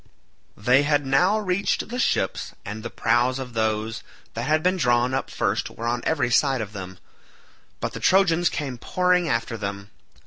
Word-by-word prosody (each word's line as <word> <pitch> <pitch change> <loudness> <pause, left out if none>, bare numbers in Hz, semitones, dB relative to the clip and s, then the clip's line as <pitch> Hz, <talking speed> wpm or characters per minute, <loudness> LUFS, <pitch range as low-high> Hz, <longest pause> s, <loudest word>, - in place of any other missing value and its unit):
They 125 +6 +4
had 145 -1 +1
now 180 +10 +3
reached 200 -1 -1
the 245 +2 -4
ships - - 0
and 105 +2 -6
the 120 - -5
prows 120 +3 +1
of 130 -2 -7
those 110 0 -1 0.3
that 115 +3 -4
had 155 +1 +2
been 180 +1 +3
drawn 125 -4 +2
up 135 - -2
first - - -1
were 115 - -7
on 120 +1 0
every 145 -6 +1
side 135 +1 +3
of 105 -2 -5
them, 95 -2 -8 0.8
but - - -3
the - - -6
Trojans 175 -3 +3
came 135 -5 -4
pouring 180 +1 +1
after 115 -2 -1
them. 100 -1 -6
130 Hz, 175 wpm, -24 LUFS, 115-165 Hz, 0.8 s, They